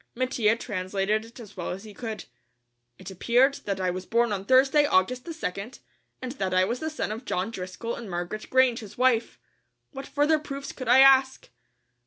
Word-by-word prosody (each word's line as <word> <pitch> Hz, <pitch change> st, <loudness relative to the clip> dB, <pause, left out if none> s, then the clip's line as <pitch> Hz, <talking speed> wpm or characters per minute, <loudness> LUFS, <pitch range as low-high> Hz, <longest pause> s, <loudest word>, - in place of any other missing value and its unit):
Mattia 235 Hz, -3 st, +1 dB
translated 205 Hz, 0 st, -2 dB
it 230 Hz, +2 st, -15 dB
as 210 Hz, -4 st, -12 dB
well 175 Hz, -, -5 dB
as 190 Hz, +3 st, -6 dB
he 215 Hz, -1 st, -11 dB
could. 220 Hz, 0 st, -6 dB, 0.7 s
It 190 Hz, +1 st, -9 dB
appeared 245 Hz, +8 st, +3 dB
that 195 Hz, -2 st, -2 dB
I 185 Hz, -1 st, 0 dB
was 185 Hz, +1 st, -6 dB
born 235 Hz, -1 st, +2 dB
on 195 Hz, -1 st, -4 dB
Thursday, 270 Hz, +4 st, +4 dB
August 250 Hz, +4 st, +1 dB
the 340 Hz, -, -6 dB
2nd, 225 Hz, -, -5 dB, 0.5 s
and 255 Hz, -, -4 dB
that 190 Hz, -9 st, -2 dB
I 185 Hz, 0 st, +4 dB
was 235 Hz, +5 st, -3 dB
the 315 Hz, -, -3 dB
son 310 Hz, -8 st, -4 dB
of 225 Hz, +4 st, -6 dB
John 195 Hz, -2 st, -2 dB
Driscoll 190 Hz, +4 st, -5 dB
and 235 Hz, -4 st, -7 dB
Margaret 175 Hz, +4 st, -5 dB
Grange, 260 Hz, -2 st, +3 dB
his 215 Hz, -4 st, -11 dB
wife. 245 Hz, -2 st, +1 dB, 0.5 s
What 270 Hz, -2 st, -8 dB
further 295 Hz, +2 st, +2 dB
proofs 280 Hz, -2 st, -7 dB
could 255 Hz, -, -8 dB
I 260 Hz, +3 st, +7 dB
ask? 270 Hz, -1 st, +4 dB
230 Hz, 195 wpm, -26 LUFS, 195-260 Hz, 0.7 s, I